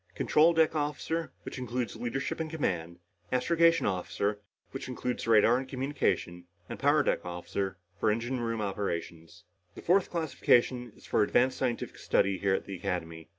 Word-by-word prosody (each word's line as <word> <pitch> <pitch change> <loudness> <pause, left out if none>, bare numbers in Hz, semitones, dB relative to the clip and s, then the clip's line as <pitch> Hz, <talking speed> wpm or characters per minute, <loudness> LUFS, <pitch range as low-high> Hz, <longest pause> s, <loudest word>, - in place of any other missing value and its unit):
Control 160 +3 +4
deck 160 -1 +3
officer, 155 +2 -2
which - - -7
includes 125 -1 -3
leadership 125 +6 -3
and 160 -1 -2
command. 90 - -2 0.3
Astrogation 165 +6 +3
officer, 100 +2 -1 0.3
which 135 - -6
includes 125 -2 -3
radar 115 +2 +5
and 135 - -6
communications. 130 -10 -1 0.2
And - - -7
power 145 +1 +4
deck - - 0
officer 90 +2 -4 0.2
for - - +2
engine 120 +4 -1
room 115 -2 -2
operations. 85 -5 -4 0.3
The - - -10
fourth 185 +2 +3
classification 125 -6 +1
is - - -17
for - - +1
advanced 125 +5 +2
scientific 120 -3 -2
study 100 -1 +1
here 100 -1 +2
at - - -4
the 100 - -6
Academy. 85 -3 -4
120 Hz, 155 wpm, -30 LUFS, 95-145 Hz, 0.3 s, radar